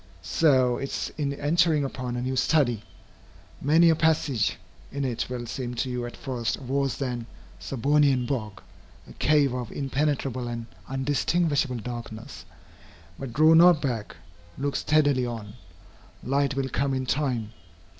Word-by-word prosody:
So 130 Hz, -, +3 dB
it 135 Hz, -, -4 dB
is -, -, -4 dB
in 145 Hz, -2 st, -1 dB
entering 155 Hz, +1 st, +2 dB
upon 125 Hz, -2 st, -4 dB
a 125 Hz, -, -2 dB
new 130 Hz, +1 st, -2 dB
study. 125 Hz, -6 st, +2 dB, 0.8 s
Many 165 Hz, +4 st, +5 dB
a -, -, +3 dB
passage 150 Hz, -8 st, +1 dB, 0.3 s
in 140 Hz, 0 st, -2 dB
it 120 Hz, -2 st, -2 dB
will 125 Hz, -1 st, -4 dB
seem 125 Hz, +1 st, -5 dB
to 130 Hz, +2 st, -2 dB
you 125 Hz, -1 st, -3 dB
at 120 Hz, -, -10 dB
first 120 Hz, -4 st, -2 dB
a -, -, -12 dB
worse 135 Hz, +1 st, 0 dB
than 125 Hz, -4 st, -3 dB, 0.3 s
Serbonian 135 Hz, 0 st, +2 dB
bog 110 Hz, -7 st, -4 dB, 0.4 s
a -, -, -12 dB
cave 145 Hz, -3 st, +3 dB
of 125 Hz, -3 st, -4 dB
impenetrable 135 Hz, -3 st, -1 dB
and 120 Hz, -1 st, -4 dB, 0.2 s
undistinguishable 145 Hz, +1 st, 0 dB
darkness. 115 Hz, -1 st, -7 dB, 0.7 s
But 135 Hz, -3 st, -5 dB
draw 155 Hz, +6 st, +5 dB
not 170 Hz, 0 st, +7 dB
back. 120 Hz, -8 st, -3 dB, 0.4 s
Look 140 Hz, +1 st, -2 dB
steadily 145 Hz, -5 st, +2 dB
on. 110 Hz, -3 st, -6 dB, 0.7 s
Light 140 Hz, +1 st, +1 dB
will 135 Hz, -1 st, -1 dB
come 135 Hz, +1 st, 0 dB
in 130 Hz, 0 st, -2 dB
time. 125 Hz, -5 st, -1 dB
135 Hz, 145 wpm, -26 LUFS, 120-145 Hz, 0.8 s, not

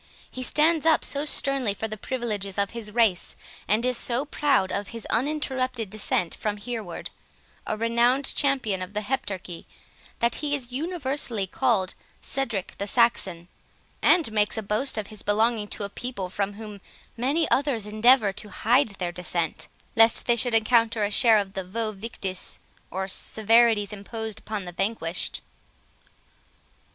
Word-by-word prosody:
He 255 Hz, -, -6 dB
stands 310 Hz, +4 st, +3 dB
up 320 Hz, -, +4 dB
sternly 275 Hz, -6 st, +1 dB
for 220 Hz, -, -3 dB
the 215 Hz, -, -4 dB
privileges 210 Hz, -4 st, -3 dB
of 200 Hz, 0 st, +1 dB
his 230 Hz, -2 st, -5 dB
race, 215 Hz, -5 st, +1 dB, 0.3 s
and 215 Hz, +4 st, +2 dB
is 250 Hz, -1 st, +1 dB
so 245 Hz, +3 st, 0 dB
proud 285 Hz, -10 st, +1 dB
of 200 Hz, 0 st, -2 dB
his 230 Hz, +1 st, -7 dB
uninterrupted 255 Hz, -4 st, -1 dB
descend 200 Hz, -5 st, 0 dB
from 210 Hz, -1 st, -3 dB
Hereward, 210 Hz, -4 st, -6 dB, 0.6 s
a 215 Hz, -, -1 dB
renowned 235 Hz, +4 st, +2 dB
champion 255 Hz, -9 st, +1 dB
of 185 Hz, +2 st, -6 dB
the 210 Hz, -, 0 dB
Heptarchy, 195 Hz, -7 st, -4 dB, 0.5 s
that 235 Hz, 0 st, +1 dB
he 290 Hz, -1 st, 0 dB
is 250 Hz, -3 st, -5 dB
universally 270 Hz, -, -1 dB
called 185 Hz, 0 st, +1 dB, 0.3 s
Cedric 235 Hz, -8 st, -3 dB
the 200 Hz, -, -2 dB
Saxon; 195 Hz, -7 st, +2 dB, 0.5 s
and 330 Hz, -10 st, +4 dB
makes 210 Hz, 0 st, +1 dB
a 220 Hz, -, -2 dB
boast 215 Hz, +6 st, 0 dB
of 215 Hz, -, -2 dB
his 215 Hz, -, -6 dB
belonging 215 Hz, +1 st, +1 dB
to 205 Hz, -, -3 dB
a -, -, -1 dB
people 200 Hz, -3 st, -5 dB
from 200 Hz, +2 st, -2 dB
whom 210 Hz, -1 st, -9 dB, 0.3 s
many 280 Hz, +7 st, +1 dB
others 265 Hz, -6 st, +1 dB
endeaver 215 Hz, 0 st, +4 dB
to 210 Hz, 0 st, -6 dB
hide 240 Hz, +8 st, +3 dB
their 175 Hz, -2 st, -2 dB
descent, 175 Hz, -2 st, -2 dB, 0.3 s
lest 225 Hz, 0 st, +6 dB
they 240 Hz, -, +4 dB
should 235 Hz, 0 st, +1 dB
encounter 225 Hz, -1 st, +3 dB
a 205 Hz, -, 0 dB
share 225 Hz, +1 st, +7 dB
of 200 Hz, -2 st, -2 dB
the 190 Hz, -, -3 dB
'vae 215 Hz, +4 st, -2 dB
victis,' 195 Hz, -3 st, -5 dB, 0.3 s
or 190 Hz, +1 st, -3 dB
severities 220 Hz, +1 st, +3 dB
imposed 220 Hz, +1 st, -6 dB
upon 215 Hz, -3 st, -5 dB
the 175 Hz, -, -6 dB
vanquished." 180 Hz, -2 st, -2 dB
220 Hz, 155 wpm, -26 LUFS, 200-250 Hz, 0.6 s, share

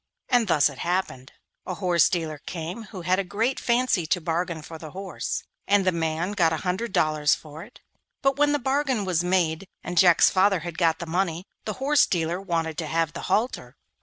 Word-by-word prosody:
And 245 Hz, -4 st, +3 dB
thus 150 Hz, -5 st, +4 dB
it 140 Hz, -3 st, -8 dB
happened. 170 Hz, -7 st, -2 dB, 0.4 s
A 185 Hz, -, -3 dB
horse 175 Hz, -2 st, +3 dB
dealer 160 Hz, -4 st, -2 dB
came 175 Hz, +6 st, -5 dB
who 190 Hz, -3 st, -9 dB
had 185 Hz, +2 st, +2 dB
a -, -, 0 dB
great 225 Hz, +8 st, -1 dB
fancy 235 Hz, -8 st, +1 dB
to 180 Hz, -, +1 dB
bargain 170 Hz, -1 st, -2 dB
for 160 Hz, 0 st, -9 dB
the 155 Hz, -, -8 dB
horse, 190 Hz, +3 st, -4 dB, 0.2 s
and 200 Hz, -1 st, +3 dB
the 185 Hz, -, +4 dB
man 165 Hz, +2 st, -1 dB
got 175 Hz, -6 st, +2 dB
a 160 Hz, -, 0 dB
hundred 190 Hz, +6 st, -1 dB
dollars 155 Hz, -3 st, +2 dB
for 155 Hz, 0 st, -11 dB
it, -, -, -14 dB, 0.4 s
but 275 Hz, 0 st, +3 dB
when 290 Hz, 0 st, +3 dB
the 290 Hz, -, +2 dB
bargain 265 Hz, -4 st, 0 dB
was 175 Hz, -2 st, +1 dB
made, 180 Hz, -1 st, 0 dB, 0.2 s
and 175 Hz, -1 st, 0 dB
Jack's 175 Hz, -3 st, +6 dB
father 195 Hz, -1 st, +3 dB
had 170 Hz, +1 st, -6 dB
got 165 Hz, -2 st, +3 dB
the 170 Hz, -, -6 dB
money, 175 Hz, +1 st, -1 dB, 0.2 s
the 215 Hz, -, -2 dB
horse 280 Hz, +4 st, +3 dB
dealer 175 Hz, +1 st, -1 dB
wanted 165 Hz, -4 st, -2 dB
to 160 Hz, -, -3 dB
have 165 Hz, 0 st, 0 dB
the -, -, -6 dB
halter. 205 Hz, -, -1 dB
180 Hz, 205 wpm, -25 LUFS, 160-200 Hz, 0.4 s, Jack's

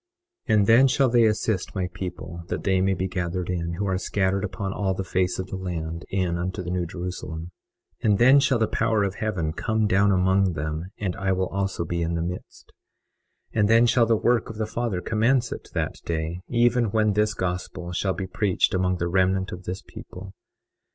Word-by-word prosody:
21:24 110 Hz, -, +5 dB
And 100 Hz, -, +4 dB
then 115 Hz, +5 st, +6 dB
shall 135 Hz, 0 st, +3 dB
they 120 Hz, -1 st, +5 dB
assist 105 Hz, -3 st, 0 dB
my 95 Hz, -2 st, -1 dB
people 85 Hz, -2 st, -6 dB
that -, -, -3 dB
they 95 Hz, -1 st, +2 dB
may 95 Hz, 0 st, +2 dB
be 95 Hz, +1 st, -1 dB
gathered 90 Hz, -1 st, -3 dB
in, 85 Hz, -1 st, -2 dB
who 100 Hz, +4 st, -2 dB
are 95 Hz, -1 st, 0 dB
scattered 95 Hz, +1 st, 0 dB
upon 95 Hz, 0 st, -3 dB
all 95 Hz, -2 st, -1 dB
the 95 Hz, -, -3 dB
face 90 Hz, -1 st, 0 dB
of 95 Hz, -, -3 dB
the -, -, -3 dB
land, 85 Hz, -3 st, -4 dB
in 90 Hz, -3 st, 0 dB
unto 95 Hz, +2 st, -3 dB
the 90 Hz, -, -4 dB
New 90 Hz, -1 st, -1 dB
Jerusalem. 85 Hz, -1 st, -6 dB, 0.5 s
21:25 -, -, +3 dB
And 100 Hz, -, +4 dB
then 130 Hz, +5 st, +7 dB
shall 135 Hz, -2 st, +3 dB
the 110 Hz, -1 st, +1 dB
power 110 Hz, -2 st, +1 dB
of 100 Hz, -2 st, -1 dB
heaven 95 Hz, -7 st, -2 dB
come 110 Hz, +4 st, 0 dB
down 100 Hz, 0 st, +3 dB
among 95 Hz, 0 st, +3 dB
them; 80 Hz, +2 st, -3 dB
and 95 Hz, -4 st, -2 dB
I 100 Hz, 0 st, -1 dB
also 95 Hz, 0 st, -1 dB
will -, -, -8 dB
be 85 Hz, 0 st, -2 dB
in 85 Hz, 0 st, -1 dB
the 85 Hz, -, -1 dB
midst. 90 Hz, +2 st, -7 dB, 0.8 s
21:26 -, -, -1 dB
And 105 Hz, 0 st, +3 dB
then 115 Hz, +1 st, +6 dB
shall 120 Hz, -1 st, +4 dB
the 115 Hz, -, +4 dB
work 120 Hz, 0 st, +1 dB
of 110 Hz, -, -7 dB
the 110 Hz, -, -1 dB
Father 115 Hz, -4 st, -2 dB
commence 115 Hz, +4 st, +1 dB
at -, -, -6 dB
that -, -, -1 dB
day, 80 Hz, +1 st, -3 dB
even 120 Hz, 0 st, +3 dB
when 110 Hz, 0 st, +2 dB
this 105 Hz, +1 st, +1 dB
gospel 90 Hz, -1 st, -4 dB
shall 95 Hz, +2 st, 0 dB
be 95 Hz, -, -4 dB
preached 95 Hz, +1 st, +1 dB
among 90 Hz, -1 st, +1 dB
the 85 Hz, -, -1 dB
remnant 95 Hz, +1 st, +1 dB
of 90 Hz, 0 st, -8 dB
this 90 Hz, +1 st, -5 dB
people. 95 Hz, +1 st, -10 dB
95 Hz, 215 wpm, -25 LUFS, 90-105 Hz, 0.8 s, then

